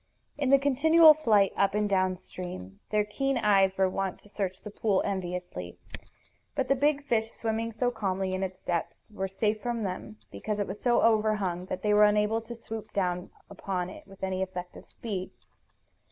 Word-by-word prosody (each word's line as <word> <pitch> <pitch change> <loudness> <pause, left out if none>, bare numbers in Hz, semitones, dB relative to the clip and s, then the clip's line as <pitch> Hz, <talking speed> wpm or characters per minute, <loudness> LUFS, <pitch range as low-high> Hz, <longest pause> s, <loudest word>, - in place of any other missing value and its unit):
In 280 -3 -1
the 275 - +7
continual 310 +4 +6
flight 215 -10 +3
up 200 0 +2
and 210 0 +1
downstream 185 - -3
their 210 -1 +2
keen 270 +5 -1
eyes 195 -4 +3
were 190 0 +4
wont 190 0 -2
to 205 - -15
search 195 -2 -4
the 210 - -7
pool 205 -2 +1
enviously. 180 -2 -4 0.8
But 270 -2 -1
the 275 - +4
big 290 +1 +1
fish 230 -5 +1
swimming 225 0 -2
so 245 +2 0
calmly 190 -4 -2
in 185 - -2
its 185 -1 -5
depths 175 +5 -3
were 195 -2 -2
safe 210 +3 -1
from 240 -2 -2
them, 180 - -5
because 205 - -3
it 205 - +1
was 195 +2 -6
so 240 -1 +3
overhung 210 -5 +2
that 185 - -5
they 210 -1 +3
were 210 0 +7
unable 210 +2 +2
to 235 +1 -8
swoop 220 -1 -7
down 180 -2 -1 0.2
upon 185 -2 -4
it - - -12
with 195 -1 -14
any 190 0 -1
effective 180 -1 -6
speed. 195 -5 -5
205 Hz, 180 wpm, -28 LUFS, 185-225 Hz, 0.8 s, the